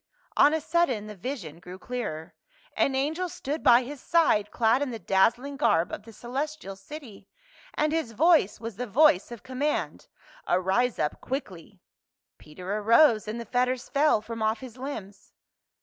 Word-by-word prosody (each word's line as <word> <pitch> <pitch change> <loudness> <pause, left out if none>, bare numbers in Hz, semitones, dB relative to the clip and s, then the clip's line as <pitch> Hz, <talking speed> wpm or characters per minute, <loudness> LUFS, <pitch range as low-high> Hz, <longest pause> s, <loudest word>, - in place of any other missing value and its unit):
On 290 - +6
a 320 - +1
sudden 305 -9 0
the 215 - -8
vision 185 - -6
grew 180 +1 -10
clearer; 200 -9 -5 0.4
an 270 - +1
angel 315 +7 -1
stood 295 0 -4
by 245 0 +6
his 275 +1 -8
side 260 -12 +2
clad 235 +4 +2
in 285 - -1
the 235 - -5
dazzling 235 +8 +1
garb 170 - +2
of - - -5
the 225 - -11
celestial 265 -1 -5
city. 220 +2 -11 0.5
And 305 0 +1
his 320 -8 -2
voice 310 - +3
was 230 -3 -7
the 250 +1 -4
voice 230 -3 +4
of 235 - -9
com 255 0 -8
mand. 295 +1 -2 0.2
" - - -24
Arise 195 +7 +1
up 150 - -2
quickly 195 - -6 0.3
!" - - -65
Peter 180 +6 -6
arose, 225 +1 +4
and 220 +2 -4
the 235 - -6
fetters 250 +2 -1
fell 285 -6 +3
from 230 0 -7
off 220 +1 +1
his 250 -3 -10
limbs. 220 -7 -8
240 Hz, 175 wpm, -27 LUFS, 205-285 Hz, 0.5 s, On